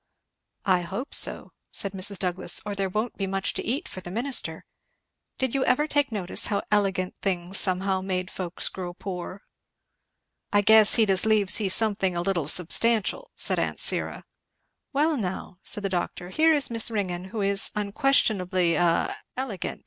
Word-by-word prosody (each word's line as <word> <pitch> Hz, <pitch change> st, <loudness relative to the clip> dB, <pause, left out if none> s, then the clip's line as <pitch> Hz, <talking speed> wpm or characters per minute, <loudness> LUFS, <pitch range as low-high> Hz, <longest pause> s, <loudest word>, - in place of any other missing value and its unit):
"I 185 Hz, -3 st, +2 dB
hope 195 Hz, +10 st, -6 dB
so," -, -, +3 dB, 0.2 s
said 200 Hz, -, 0 dB
Mrs. 195 Hz, +1 st, +1 dB
Douglass, 180 Hz, -1 st, -1 dB
"or 205 Hz, -, -4 dB
there 195 Hz, -1 st, -2 dB
won't 215 Hz, +5 st, -3 dB
be 195 Hz, -, -3 dB
much 195 Hz, 0 st, -2 dB
to -, -, -4 dB
eat 275 Hz, +10 st, -3 dB
for 185 Hz, -, -8 dB
the 175 Hz, -, -9 dB
minister. 245 Hz, +8 st, -2 dB, 0.7 s
Did 260 Hz, -2 st, -2 dB
you 275 Hz, -, 0 dB
never 260 Hz, +3 st, +2 dB
take 290 Hz, -3 st, 0 dB
notice 195 Hz, -5 st, -1 dB
how 200 Hz, -2 st, -2 dB
elegant 195 Hz, -3 st, 0 dB
things 185 Hz, -1 st, 0 dB
somehow 190 Hz, 0 st, 0 dB
made 185 Hz, -1 st, -3 dB
folks 180 Hz, -2 st, -1 dB
grow 180 Hz, -2 st, -7 dB
poor?" 185 Hz, 0 st, -7 dB, 1.1 s
"I 205 Hz, -, +3 dB
guess 220 Hz, 0 st, +6 dB
he'd 220 Hz, -4 st, +3 dB
as 190 Hz, +3 st, +5 dB
leave 210 Hz, -3 st, +2 dB
see 205 Hz, -3 st, +4 dB
something 195 Hz, -2 st, +1 dB
a 170 Hz, -, -2 dB
little 175 Hz, -6 st, -1 dB
substantial," 225 Hz, -, +2 dB
said -, -, +2 dB
aunt -, -, -3 dB
Syra. -, -, 0 dB, 0.7 s
"Well 300 Hz, +3 st, +1 dB
now," 185 Hz, -3 st, -6 dB
said 210 Hz, -, -2 dB
the -, -, 0 dB
doctor, 180 Hz, -1 st, -4 dB
"here 320 Hz, +10 st, +3 dB
is 290 Hz, -5 st, +4 dB
Miss 230 Hz, +1 st, +5 dB
Ringgan, 185 Hz, -5 st, -3 dB
who 205 Hz, +3 st, -6 dB
is 200 Hz, +1 st, +5 dB
unquestionably 200 Hz, -, +1 dB
a 170 Hz, -1 st, 0 dB, 0.2 s
elegant! 250 Hz, -8 st, -5 dB
195 Hz, 170 wpm, -25 LUFS, 185-225 Hz, 1.1 s, guess